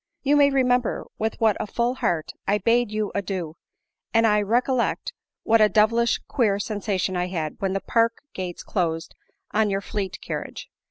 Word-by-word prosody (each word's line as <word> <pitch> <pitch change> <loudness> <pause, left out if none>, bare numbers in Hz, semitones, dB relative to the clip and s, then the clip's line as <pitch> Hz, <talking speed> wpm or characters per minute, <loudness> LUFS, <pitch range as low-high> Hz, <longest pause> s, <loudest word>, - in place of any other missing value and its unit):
You 285 +1 +3
may 285 -1 +6
remember 250 -3 +1
with 220 +1 -2
what 220 -3 +3
a - - -3
full 235 +4 0
heart 170 -11 -1 0.2
I 205 - +3
bade 230 +1 +2
you 215 -1 -2
adieu, 185 -5 -3 0.6
and 225 0 +5
I 210 -1 +4
'recollect 240 - 0 0.3
what 225 0 +4
a 215 - +6
devilish 230 +3 +3
queer 215 -7 +1
sensation 200 -2 -2
I 180 0 0
had 160 -4 -4
when 190 -1 -1
the 195 - -1
park 230 0 +2 0.2
gates 180 -2 -5
closed 165 -4 -2 0.4
on 215 0 +2
your 195 0 -1
fleet 195 -2 -4
carriage. - - -6
210 Hz, 170 wpm, -24 LUFS, 190-235 Hz, 0.6 s, may